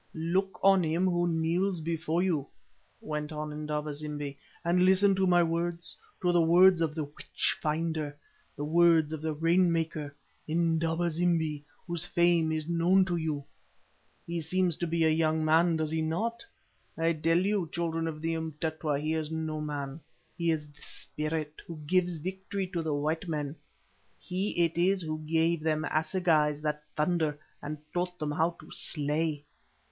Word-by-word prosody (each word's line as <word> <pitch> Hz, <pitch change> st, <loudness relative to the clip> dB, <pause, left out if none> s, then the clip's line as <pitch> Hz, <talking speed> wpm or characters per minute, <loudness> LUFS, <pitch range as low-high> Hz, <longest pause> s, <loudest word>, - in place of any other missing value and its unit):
"Look 185 Hz, +4 st, -1 dB
on 195 Hz, -1 st, +6 dB
him 165 Hz, +3 st, +1 dB
who 175 Hz, -1 st, +2 dB
kneels 170 Hz, +3 st, 0 dB
before 165 Hz, +1 st, -1 dB
you," 155 Hz, -7 st, 0 dB, 0.5 s
went 150 Hz, 0 st, -4 dB
on 150 Hz, 0 st, -4 dB
Indaba 150 Hz, 0 st, -3 dB
zimbi, 145 Hz, -1 st, -5 dB, 0.3 s
"and 180 Hz, +1 st, +3 dB
listen 190 Hz, +2 st, +5 dB
to 190 Hz, 0 st, +2 dB
my 175 Hz, -1 st, +5 dB
words, 170 Hz, 0 st, -2 dB, 0.3 s
to 180 Hz, -, +4 dB
the 175 Hz, -1 st, +4 dB
words 175 Hz, +2 st, +6 dB
of 155 Hz, -2 st, 0 dB
the 155 Hz, -, -1 dB
witch 145 Hz, 0 st, -2 dB
finder, 155 Hz, -1 st, -1 dB, 0.4 s
the 145 Hz, -, -4 dB
words 165 Hz, -1 st, +4 dB
of 155 Hz, -, -5 dB
the 160 Hz, 0 st, -1 dB
rain 170 Hz, +3 st, +3 dB
maker, 160 Hz, -3 st, -2 dB, 0.3 s
Indaba 165 Hz, +1 st, +1 dB
zimbi, 160 Hz, -3 st, 0 dB, 0.2 s
whose 170 Hz, -2 st, 0 dB
fame 170 Hz, -2 st, +2 dB
is 155 Hz, -1 st, -2 dB
known 175 Hz, +3 st, +4 dB
to 175 Hz, -2 st, -1 dB
you. 155 Hz, -3 st, -2 dB, 0.8 s
He 170 Hz, 0 st, -3 dB
seems 180 Hz, +1 st, +1 dB
to 175 Hz, -, -2 dB
be 165 Hz, 0 st, +1 dB
a 160 Hz, -, +5 dB
young 155 Hz, 0 st, +2 dB
man, 165 Hz, +2 st, +4 dB
does 155 Hz, -1 st, -1 dB
he 160 Hz, 0 st, 0 dB
not? 220 Hz, +10 st, -2 dB, 0.5 s
I 165 Hz, +1 st, +2 dB
tell 165 Hz, +1 st, +2 dB
you, 190 Hz, -2 st, +1 dB
children 165 Hz, -1 st, -1 dB
of 155 Hz, -1 st, -5 dB
the 165 Hz, 0 st, 0 dB
Umtetwa, 160 Hz, -2 st, -2 dB
he 155 Hz, +2 st, -1 dB
is 160 Hz, -1 st, -2 dB
no 160 Hz, -1 st, -3 dB
man. 145 Hz, -1 st, -4 dB, 0.4 s
He 170 Hz, -1 st, 0 dB
is 155 Hz, -2 st, 0 dB
the 150 Hz, 0 st, -20 dB
Spirit 155 Hz, 0 st, -4 dB
who 170 Hz, -, -7 dB
gives 180 Hz, +1 st, +1 dB
victory 190 Hz, +4 st, -4 dB
to 175 Hz, -3 st, -2 dB
the 155 Hz, -2 st, -1 dB
white 155 Hz, +4 st, -1 dB
men, 150 Hz, -2 st, -3 dB, 0.6 s
he 185 Hz, -1 st, 0 dB
it 165 Hz, +1 st, -3 dB
is 185 Hz, +1 st, +3 dB
who 155 Hz, -1 st, -3 dB
gave 165 Hz, +1 st, +2 dB
them 155 Hz, 0 st, 0 dB
assegais 155 Hz, -3 st, +2 dB
that 150 Hz, -1 st, -2 dB
thunder 155 Hz, -1 st, +1 dB, 0.2 s
and 150 Hz, +1 st, -5 dB, 0.2 s
taught 180 Hz, 0 st, -2 dB
them 150 Hz, -2 st, -2 dB
how 165 Hz, +3 st, 0 dB
to -, -, -14 dB
slay. 150 Hz, 0 st, -1 dB
160 Hz, 170 wpm, -29 LUFS, 155-175 Hz, 0.8 s, on